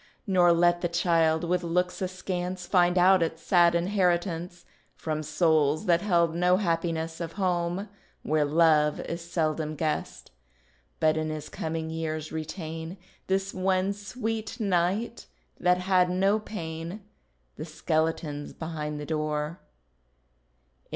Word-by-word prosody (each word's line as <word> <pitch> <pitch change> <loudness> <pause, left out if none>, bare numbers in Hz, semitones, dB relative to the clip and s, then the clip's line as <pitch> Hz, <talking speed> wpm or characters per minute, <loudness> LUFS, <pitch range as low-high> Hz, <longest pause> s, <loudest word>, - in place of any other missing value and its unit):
Nor 180 -4 +4
let 175 +1 +3
the 175 - +1
child, 165 -2 +2
with 175 +1 0
looks 180 +2 -1
askance, 185 -1 -3
Find 175 -1 +3
out 185 +1 +6
its 165 0 -2
sad 175 -2 +4
inheritance 175 -1 0 0.3
From 155 -1 -3
souls 155 -1 +2
that 170 -1 +3
held 170 -5 +2
no 180 +2 +3
happiness, 165 -3 -1
Of 165 -1 -5
home, 180 0 -1 0.4
where 155 0 +2
love 150 0 +3
is 170 +1 -5
seldom 155 -2 -2
guest; 155 0 -3 0.7
But 155 0 +3
in 155 0 -1
his 155 -1 -5
coming 160 0 -4
years 155 -1 -4
retain 160 +2 -6 0.3
This 195 +1 0
one 185 +1 +1
sweet 220 +2 -4
night 200 +3 0 0.3
that 180 0 +3
had 180 -1 +2
no 195 +4 +2
pain; 170 -2 -6 0.6
The 155 - -5
skeleton's 155 -2 -2
behind 150 -2 -5
the 150 - -5
door. 155 +1 -2
170 Hz, 125 wpm, -27 LUFS, 160-185 Hz, 0.7 s, out